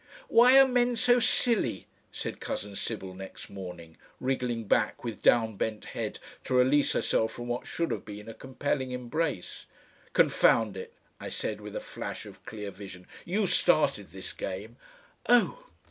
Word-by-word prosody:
"Why 250 +3 +8
are 270 - +8
men 245 -1 +2
so 245 +1 +4
silly?" 230 - +1 0.3
said - - -5
cousin 100 0 -4
Sybil 95 -3 -4
next 95 +1 -10
morning, 90 -4 -9 0.2
wriggling 125 -3 -1
back 105 +1 +1
with 115 -4 -5
down 110 -3 +3
bent 110 0 -2
head - - -3 0.3
to 130 - 0
release 130 +3 +4
herself 110 0 +1
from 120 0 -7
what 120 +1 -3
should 170 -1 -2
have - - -3
been 105 0 -9
a 115 - -7
compelling 130 +1 -2
embrace. 125 - -3 0.5
"Confound 110 -4 +4
it!" 95 - -8 0.2
I - - -6
said 105 -1 -3
with 105 0 -8
a - - -1
flash - - -6
of - - -13
clear 105 -2 -6
vision. 95 -1 -10 0.2
"You 200 +4 +1
STARTED - - +2
this - - -6
game." - - -6 0.5
"Oh!" 245 - +3
120 Hz, 160 wpm, -29 LUFS, 105-165 Hz, 0.5 s, Why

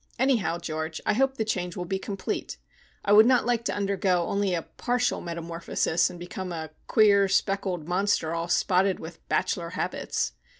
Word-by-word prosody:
Anyhow, 235 -9 +2
George, 160 -1 -4
I - - +3
hope 270 +4 +1
the 220 - 0
change 180 -5 -2
will 180 - -3
be 190 +2 -2
complete. 195 0 -4 0.5
I 205 - +4
would 215 +2 +8
not 255 -1 +4
like 240 -1 +1
to - - -1
undergo 195 -3 +1
only 200 -1 0
a 165 - -2
partial 245 0 -1
metamorphosis, 170 0 -1
and 175 - -10
become 180 +1 -6
a 160 -2 -5 0.2
queer 200 -3 +5
speckled 190 -4 0
monster 180 -3 +1
all 170 0 -2
spotted 185 +2 +2
with 165 +1 -9
bachelor 170 -1 0
habits. - - -2
190 Hz, 170 wpm, -27 LUFS, 170-205 Hz, 0.5 s, would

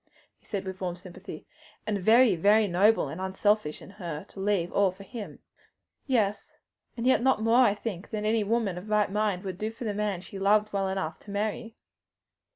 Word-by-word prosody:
he - - -27
said 195 -2 -3
with 190 0 -6
warm 180 -2 -2
sympathy, 185 +2 -10 0.4
"and 210 -2 -1
very, 225 +1 +5
very 205 +5 +4
noble 200 +5 +3
and 175 - -6
unselfish 190 -3 0
in - - -12
her 170 -7 -6
to - - -14
leave 190 -3 0
all 200 -1 +4
for 185 +2 -10
him." 220 0 -8 0.7
"Yes; 210 -6 0 0.4
and 230 - -3
yet 260 -2 +4
not 255 -4 +2
more, 230 +3 +5
I 210 -4 +3
think, 205 -4 -6
than 210 -1 -3
any 220 0 +2
right 230 +3 +1
minded 185 -1 -4 0.3
woman 205 -4 0
would 190 -2 -5
do 215 - -1
for 225 +2 -9
the 215 -3 -2
man 205 -3 -2
she 195 +2 -9
loved 210 +2 +3
well 195 -1 0
enough 185 -5 -3
to - - -16
marry." 215 +3 -3
205 Hz, 195 wpm, -28 LUFS, 190-220 Hz, 0.7 s, very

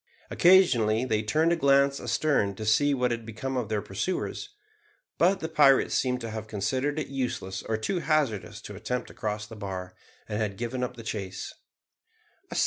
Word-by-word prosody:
Occasionally 125 - +5
they 110 -4 +1
turned 155 +10 +2
a - - +3
glance 140 -2 +3
astern 120 -11 +1
to 110 - -6
see 145 +7 +3
what 125 -1 +1
had 115 -1 -3
become 115 +4 -5
of 125 -4 -2
their 105 -2 -1
pursuers; 180 - -3 0.7
but 185 +3 +3
the 160 - -2
pirates 145 -4 +4
seemed 125 -1 0
to 115 -1 -5
have 110 0 -6
considered 130 +8 -1
it 155 - -1
useless 120 -8 -3
or 110 - -2
too 175 - -1
hazardous 150 - 0
to - - -9
attempt 125 -1 -3
to - - -12
cross 105 0 -3
the 115 - -11
bar, 95 -3 -6 0.3
and 105 - -3
had 100 -2 -2
given 120 +2 -3
up 125 0 -3
the 115 - -9
chase. 100 -4 -5
120 Hz, 180 wpm, -27 LUFS, 105-140 Hz, 0.7 s, Occasionally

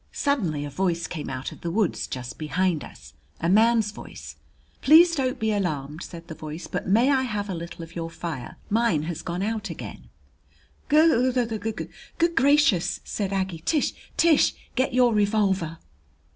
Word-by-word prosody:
Suddenly 180 - 0
a 145 - -6
voice 170 0 0
came 155 -4 -5
out 130 0 -4
of - - -13
the 170 - -3
woods 200 +1 0
just 125 -1 -6
behind 165 +1 0
us, - - -13 0.3
a 165 - -1
man's 220 +2 +4
voice. 210 - -10 0.5
"Please 335 +4 +7
don't 265 -3 0
be 220 -2 0
alarmed," 155 -6 -2
said 170 -2 -9
the 165 - -6
voice. 155 +2 -7
"But - - -4
may 230 +8 +4
I 265 -2 +3
have 210 -5 -3
a - - -2
little 170 0 -7
of 165 +1 -12
your 165 -1 -3
fire? 165 -6 -6
Mine 215 -8 +2
has 165 0 -4
gone 175 +3 -3
out 220 0 -2
again." - - -8 0.8
"G 300 -5 +5
g 250 -1 +1 0.3
g - - -4 0.3
good 335 0 +2
gracious!" 280 - +3
said 200 -2 -3
Aggie. 190 -3 -2
"T 295 - +1 0.3
Tish, 330 -3 +4 0.2
get 260 +1 +1
your 250 -2 +4
revolver!" 200 -6 +1
195 Hz, 170 wpm, -25 LUFS, 165-245 Hz, 0.8 s, Please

